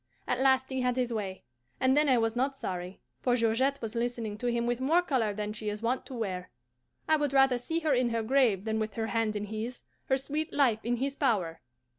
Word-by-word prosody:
At 250 - 0
last 265 0 +3
he 260 -1 -1
had 250 -1 +1
his 250 -2 0
way, 195 -4 -4 0.4
and 260 +1 +3
then 300 0 +4
I 255 - +5
was 225 0 +1
not 270 +3 0
sorry; 180 -6 -5 0.2
for 245 -1 +2
Georgette 250 +4 +1
was 225 -1 -4
listening 235 -3 -2
to 245 - -2
him 235 0 0
with 240 0 0
more 320 +7 +3
colour 250 -10 +1
than 210 +1 -4
she 215 0 -3
is 210 +2 -5
wont 245 +3 -1
to 260 - -7
wear. 185 -6 -3 0.6
I 315 - +4
would 290 -2 -1
rather 270 -2 +5
see 325 +7 -2
her 310 -3 +2
in 250 -1 +2
her 230 -1 -1
grave 225 -5 +2
than 220 0 0
with 215 -1 -3
her 225 - -1
hand 225 -2 +1
in 205 - -2
his, 220 +4 -5 0.2
her 265 - +2
sweet 295 +3 -3
life 245 -7 +3
in 240 +1 0
his 275 +3 -2
power. 200 - 0
240 Hz, 235 wpm, -30 LUFS, 220-265 Hz, 0.6 s, I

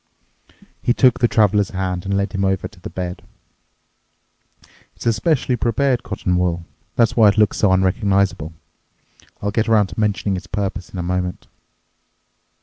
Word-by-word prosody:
He 120 - +1
took 130 -3 +4
the 120 - +4
Traveler's 105 -3 +2
hand 95 -1 -3
and 100 +1 0
led 100 -1 -1
him 95 - -1
over 95 -1 0
to 95 -1 -19
the - - -8
bed. 90 -1 -5 1.7
"It's - - -11
a 115 - +3
specially 125 +3 +1
prepared 125 +1 +1
cotton 95 -3 -2
wool. 85 -1 -1 0.3
That's 115 -2 +2
why 110 -3 +6
it 100 - 0
looks 105 -2 +3
so 105 - +3
unrecognizable. 95 -3 +1 0.9
I'll 100 - 0
get 110 +1 0
around 105 -3 +3
to - - -7
mentioning 105 -2 0
its 90 - -9
purpose 100 -3 -3
in - - -9
a 90 - -2
moment." 90 0 -3
100 Hz, 160 wpm, -20 LUFS, 95-110 Hz, 1.7 s, why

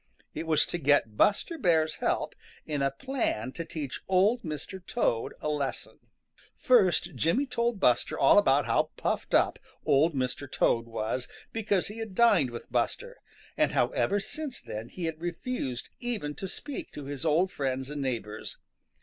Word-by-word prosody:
It 165 - -5
was 155 -2 +4
to 175 - -4
get 145 -7 +3
Buster 260 - +2
Bear's 160 -4 +2
help - - 0 0.3
in 150 -3 -2
a 135 - +3
plan 135 - -2
to 165 - -5
teach 155 -5 -5
Old 200 +6 +3
Mr. 160 +4 -6
Toad 120 - 0
a - - -2
lesson. 145 -3 -3 0.6
First 190 -8 +3
Jimmy 200 - +2
told 235 -4 -1
Buster 125 -9 +2
all - - +7
about - - +3
how - - +2
puffed - - -1
up - - +3 0.3
Old 150 +3 +4
Mr. 130 +1 -2
Toad 115 0 +2
was 115 +2 -2 0.3
because 205 -4 +1
he 210 +2 -7
had 220 -4 -6
dined 185 - +5
with 120 0 -9
Buster, - - -1 0.4
and - - +2
how - - +3
ever 200 +1 +1
since 290 +6 -5
then 110 +2 -7
he 180 - -5
had 160 -1 -4
refused 170 - -3
even 220 -12 -3
to 190 - -5
speak 280 +9 -6
to 145 - -7
his 140 0 -5
old 165 +4 +3
friends 135 0 -2
and 145 -1 -4
neighbors. 115 -5 -4
160 Hz, 165 wpm, -29 LUFS, 135-205 Hz, 0.6 s, all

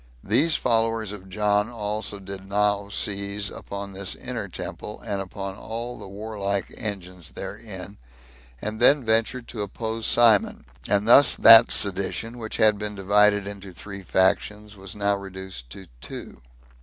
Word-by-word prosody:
These 145 +10 +2
followers 115 -3 0
of 95 -2 -10
John 105 +2 +1
also 105 -2 -3
did 95 0 -9
now 100 0 +1
seize 100 0 -2
upon 100 0 -7
this 95 0 -2
inner - - -5
temple, 105 - -7
and 100 -3 -2
upon 95 0 -6
all 115 +2 -6
the - - -9
warlike 100 -1 -4
engines 90 - -6
therein, 100 - -8 0.6
and 110 +1 -5
then 140 +3 +6
ventured 115 +2 0
to 110 - -5
oppose 110 +2 -4
Simon. 115 -4 +3 0.2
And 100 +1 +1
thus 130 +3 +7
that 115 +1 +9
sedition, 100 +4 -1
which 110 -1 -5
had 105 -2 +4
been 105 0 -4
divided 100 +1 +3
into 100 -2 -8
three 100 +2 -9
factions, 105 +3 0
was 95 -1 -10
now 100 -1 +1
reduced 95 -9 -9
to 95 - -11 0.2
two. - - -9
105 Hz, 145 wpm, -24 LUFS, 100-110 Hz, 0.6 s, that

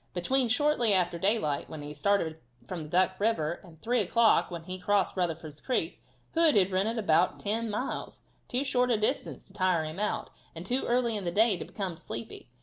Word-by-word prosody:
Between 255 +9 +2
"shortly 245 -4 +3
after 175 -2 0
daylight," 190 -7 0
when 155 -2 -7
he 145 0 -7
started 160 0 0 0.3
from 160 -3 -6
Duck 185 +2 +2
river, 175 -7 0
and 165 -4 -16
3 245 +2 +1
o'clock, 225 +3 +3
when 170 -2 -7
he 185 +2 -5
had - - -17
crossed 205 -1 +1
Rutherford's 165 -4 -3
creek. 255 - -2 0.3
Hood 325 -5 +5
had 195 -2 +4
ridden 200 +5 0
about 180 -4 +2
ten 225 +2 -1
miles 215 +5 -4 0.3
too 250 +3 -1
short 250 -2 +1
a 235 - +3
distance 215 +6 -1
to - - -20
tire 185 -4 +1
him 155 +4 -6
out, 210 0 -2 0.2
and 165 +2 -8
too 250 +6 0
early 240 -2 +1
in 205 - -2
the 175 - -1
day 215 +2 +4
to - - -6
become 190 -5 -5
sleepy. 115 -2 -7
195 Hz, 200 wpm, -29 LUFS, 170-230 Hz, 0.3 s, Hood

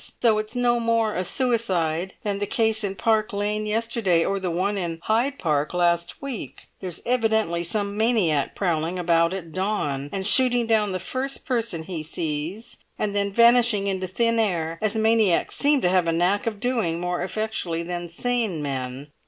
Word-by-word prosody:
So 220 -3 +3
it's 215 +3 -5
no 240 -1 +2
more 230 -2 +1
a 185 - -1
suicide 190 -7 0
than 200 -1 -2
the 205 - -2
case 220 -1 +1
in 195 -1 -2
Park 220 0 +1
Lane 210 +1 -1
yesterday 215 -6 +1
or 195 0 -1
the 185 -1 -2
one 185 +5 0
in 170 -4 -3
Hyde 245 +6 +1
Park 150 -1 -1
last 170 +5 +1
week; 270 -5 -7
there's 180 -3 -6
evidently 220 -8 +1
some 200 +3 -2
maniac 210 - +1
prowling 170 -1 -1
about 170 -1 +2
at 180 -4 -6
dawn, 155 -8 -2
and 190 -1 -3
shooting 245 +2 +4
down 215 -3 +2
the 185 - -1
first 260 +8 -4
person 230 -10 -1
he 170 -1 -5
sees 160 +6 -4 0.2
and 205 -1 -2
then 200 0 0
vanishing 235 -2 +4
into 190 -1 -2
thin 230 +5 +1
air 165 -6 -1
as 215 0 +1
maniacs 220 -5 +2
seem 285 -1 +3
to 180 - +2
have 180 -2 +2
a - - +2
knack 180 +6 +1
of 215 -3 -3
doing 220 -9 0
more 180 0 -2
effectually 185 -3 -2
than 175 0 -5
sane 225 -1 -1
men. 135 +1 -5
200 Hz, 175 wpm, -24 LUFS, 170-225 Hz, 0.2 s, shooting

